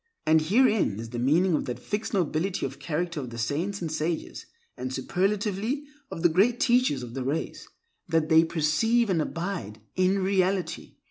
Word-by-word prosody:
And 155 0 +5
herein 210 - +2
is 115 0 -7
the 120 - -4
meaning 165 +9 +3
of 150 - 0
that 125 - -4
fixed 210 +1 -4
nobility 180 0 0
of - - -6
character 170 0 -2
of 130 -4 -5
the 115 - -8
saints 170 - -2
and 160 - -3
sages, 160 +1 -3 0.3
and 130 0 -5
superlatively, 205 - -1 0.3
of 165 - -6
the 175 - +6
Great 205 +9 +3
Teachers 240 - +2
of 120 -1 -8
the 135 0 -3
Race—that 160 - -3
they 160 0 +6
perceive 190 +9 +1
and 165 -3 +2
abide 165 - -4 0.2
in 185 +1 +2
Reality. 190 -1 0
170 Hz, 165 wpm, -27 LUFS, 150-200 Hz, 0.3 s, the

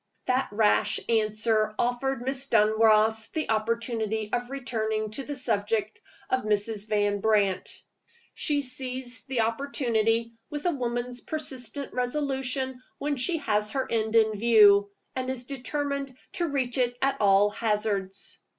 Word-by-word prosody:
That 255 +1 +1
rash 210 0 +2
answer 215 -1 +1
offered 245 +1 -1
Miss 270 +1 -1
Dunross 220 0 +4
the 310 -7 -1
opportunity 220 -1 -1
of 245 0 -1
returning 220 -5 -2
to 270 +6 -3
the 290 +2 -5
subject 215 -3 -1 0.3
of 260 - +1
Mrs. 210 0 -1
Van 205 -1 +1
Brandt. 205 -3 +1 0.6
She 290 -1 0
seized 255 -3 -3
the 255 -3 0
opportunity 230 -2 0 0.2
with 295 +2 -5
a 355 - +3
woman's 245 -3 -3
persistent 275 -3 -3
resolution 260 0 -2 0.2
when 290 0 -1
she 330 +7 0
has 210 -1 +1
her 265 -1 -1
end 220 0 0
in 220 -2 +3
view, 205 -3 +6 0.3
and 260 0 -2
is 255 -2 -3
determined 280 0 -3 0.2
to 345 - -1
reach 265 -4 -1
it 245 -1 +1
at 275 0 +2
all 200 0 +5
hazards. 210 -3 -2
235 Hz, 135 wpm, -27 LUFS, 215-260 Hz, 0.6 s, view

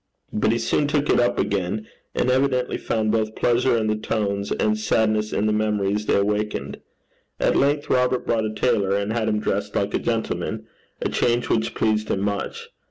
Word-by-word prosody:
But 105 0 +2
he 115 - +1
soon 120 +5 +1
took 145 0 +1
it - - +4
up 120 0 +2
again, 100 +2 -1 0.3
and 125 - +2
evidently 130 -1 +1
found 110 -1 0
both 110 -1 0
pleasure 120 0 +2
in 110 - 0
the 110 0 +1
tones 100 -2 -2
and 105 0 +1
sadness 110 0 +1
in 105 - 0
the 110 - +2
memories 105 -1 0
they - - +3
awakened. 105 +1 -1 0.6
At - - +2
length 145 +1 +2
Robert 125 0 +1
brought 110 -2 +1
a 110 - -2
tailor, 105 -4 +1
and 100 +2 -2
had 115 -2 0
him 105 - +1
dressed - - -2
like - - 0
a - - +1
gentleman - - -2 0.4
a - - 0
change 120 0 +1
which 110 0 0
pleased 110 -1 0
him 95 - 0
much. 100 0 -3
110 Hz, 190 wpm, -23 LUFS, 105-120 Hz, 0.6 s, it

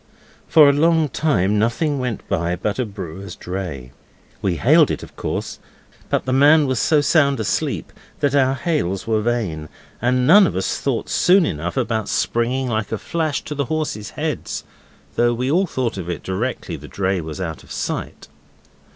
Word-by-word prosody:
For 155 -3 +7
a 140 - +5
long 160 +1 +3
time 105 - +1
nothing 135 +6 0
went 125 -4 -4
by 85 -2 0
but 100 +6 -3
a 125 - 0
brewer's 95 -2 -8
dray. 85 -9 -6 0.5
We - - 0
hailed - - +5
it, - - -3
of - - -12
course, - - -4 0.5
but - - 0
the 130 - 0
man 145 +3 +6
was 130 -4 0
so 150 +6 +3
sound 140 -3 +3
asleep 105 -3 -2 0.3
that 140 -1 +1
our 135 -1 +3
hails 120 - -1
were 110 -1 +1
vain, 105 -10 -2 0.3
and 125 +1 +2
none 200 +6 +7
of - - -4
us 95 - -1
thought - - -1
soon 185 0 +4
enough 85 - -3
about 110 -1 -1
springing 125 +3 0
like 110 -3 -2
a 110 - -1
flash 150 +7 -2
to 150 - -5
the 140 -1 -1
horses' 150 -9 -3
heads, - - -3 0.5
though 120 0 +3
we 125 +3 -1
all 185 +4 +2
thought 120 - -2
of 90 -1 -6
it 85 - -4
directly 105 +8 -3
the - - -11
dray 95 -2 -1
was 80 +2 -7
out 80 -4 -4
of - - -16
sight. - - -4
120 Hz, 180 wpm, -21 LUFS, 95-145 Hz, 0.5 s, For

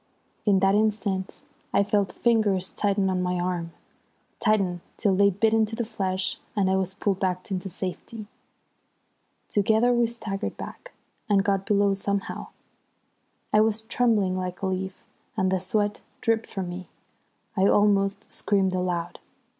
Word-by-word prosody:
In 195 -2 +4
that 195 0 +4
instant 205 -3 0 0.3
I 200 - +4
felt 200 -1 +1
fingers 210 -6 +2
tighten 200 -1 +1
on 185 -1 0
my 180 0 0
arm, 175 -2 -2 0.7
tighten 190 -5 +1 0.2
till 200 -4 +2
they 200 +1 +5
bit 215 +3 +2
into 225 0 +2
the 235 - -2
flesh, 190 -3 -2 0.2
and 195 -2 +2
I - - +3
was 190 0 -1
pulled 195 -1 0
back 185 0 -2
into 190 0 -2
safety. 195 +5 -6 1.2
Together 220 +4 +3
we 240 -1 +3
staggered 220 -3 -4
back, - - -9 0.4
and 200 -2 +4
got 195 -1 0
below 200 -1 +3
somehow. 200 0 -3 1.1
I 210 - +6
was 220 0 +2
trembling 220 -5 +2
like 185 0 -4
a - - +2
leaf, 190 0 -3 0.3
and 185 0 +2
the 190 - +2
sweat 205 +3 -1 0.2
dripped 225 0 0
from 190 -3 -4
me. 180 +1 -7 0.7
I 195 -1 +4
almost 200 0 +3
screamed 195 -2 +1
aloud. 180 -2 -2
195 Hz, 145 wpm, -26 LUFS, 185-210 Hz, 1.2 s, I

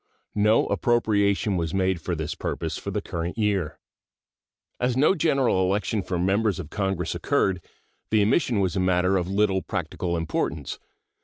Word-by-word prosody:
No 105 +2 +3
appropriation 100 -4 +1
was 85 +1 -2
made 95 -2 +1
for 90 - -2
this 80 -1 -3
purpose - - -3
for - - -6
the - - -2
current 85 +3 -4
year. 100 -7 0 1.0
As 125 0 0
no 145 +7 +5
general 140 - +2
election 100 +2 0
for 90 -1 -3
Members 95 +2 +1
of 75 - -7
Congress 95 -4 -1
occurred, 90 -3 0 0.5
the 110 -2 +3
omission 115 0 +2
was 95 0 0
a - - +1
matter 90 +1 +2
of 90 -2 0
little 95 -1 +1
practical 85 -1 -3
importance. 80 -3 -3
95 Hz, 155 wpm, -25 LUFS, 90-105 Hz, 1.0 s, no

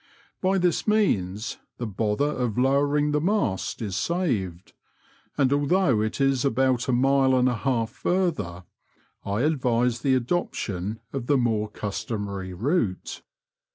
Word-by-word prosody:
By 190 +1 +2
this 180 +1 +1
means 110 - +1 0.2
the 120 - -3
bother 105 +4 0
of 125 -6 -2
lowering 145 +3 +2
the 150 0 +1
mast 165 - -1
is 100 -4 -3
saved, 105 - -2 0.6
and 135 -1 +3
although 145 - +2
it 110 +4 -2
is 135 -2 +2
about 130 -1 +1
a - - +1
mile 135 +1 +3
and 125 0 +3
a 125 - +2
half 115 -2 -1
farther, 150 - -1 0.6
I 100 +3 -1
advise 125 -5 +1
the 130 +2 +2
adoption 110 - -2
of 130 -3 -4
the 145 - +4
more 110 -4 0
customary 100 -2 -4
route. 110 - -1
125 Hz, 135 wpm, -25 LUFS, 105-145 Hz, 0.6 s, the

